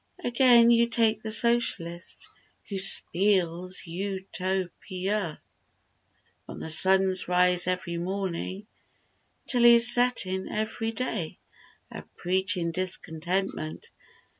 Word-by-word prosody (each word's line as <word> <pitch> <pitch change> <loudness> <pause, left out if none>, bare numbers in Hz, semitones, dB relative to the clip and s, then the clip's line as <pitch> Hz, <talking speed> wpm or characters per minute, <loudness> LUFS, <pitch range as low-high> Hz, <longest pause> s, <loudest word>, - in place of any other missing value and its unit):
Again, 240 -1 +4
you 235 0 +3
take 225 -2 +2
the 220 - -6
Socialist, 215 -7 +2 0.4
Who 200 - -5
spiels 185 -2 +1
U 190 +2 -6
to 185 -1 -3
pi 185 - -11 0.2
a 195 -8 -3 1.1
From - - -10
the 160 - -5
Sun's 190 +3 +2
rise 180 0 +2
every 180 -1 -3
mornin' 190 +1 -5 0.8
'Till 245 -2 0
his 235 0 +7
settin' 220 -7 0
every 220 +1 -4
day, 225 -8 -4 0.5
A - - -8 0.2
preachin' 185 -1 0
discontentment 180 -1 -3
190 Hz, 105 wpm, -25 LUFS, 180-225 Hz, 1.1 s, his